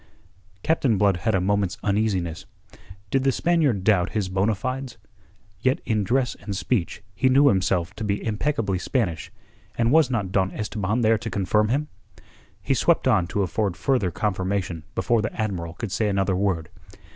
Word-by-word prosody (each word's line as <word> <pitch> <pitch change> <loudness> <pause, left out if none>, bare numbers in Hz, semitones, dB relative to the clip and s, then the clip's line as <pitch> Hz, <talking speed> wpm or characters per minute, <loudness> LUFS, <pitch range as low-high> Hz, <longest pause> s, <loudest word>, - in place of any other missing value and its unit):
Captain 135 -9 +2
Blood 100 -2 +3
had 110 +2 0
a - - +3
moment's 100 0 0
uneasiness. 100 -5 -1 0.6
Did 135 -1 +2
the 135 - +3
Spaniard 145 - +1
doubt 95 -3 +2
his 105 -4 -1
bona 95 +4 +1
fides? 130 +3 -4 0.6
Yet 130 +6 +1
in 110 -3 +1
dress 125 +2 +1
and 100 -2 -4
speech 105 -5 -2
he 115 +7 +2
knew 140 +2 +6
himself 95 -3 +1
to 110 - -4
be 100 -1 -2
impeccably 110 -4 -1
Spanish, 95 - -2 0.5
and 115 0 +2
was 155 -3 +5
not 105 -7 -2
Don 95 -1 +1
Esteban 105 +1 -2
there 110 -1 +3
to 110 - -5
confirm 105 +1 +1
him? 145 +5 0 0.8
He - - +1
swept - - +2
on 95 -5 +3
to 100 +2 -1
afford 95 +1 -1
further 105 -1 +1
confirmation 95 -3 -2
before 120 -2 +1
the 110 +2 -5
Admiral 90 -6 -3
could 115 -5 -5
say 105 +2 0
another 95 -1 +1
word. 90 -4 -1
105 Hz, 170 wpm, -24 LUFS, 95-120 Hz, 0.8 s, knew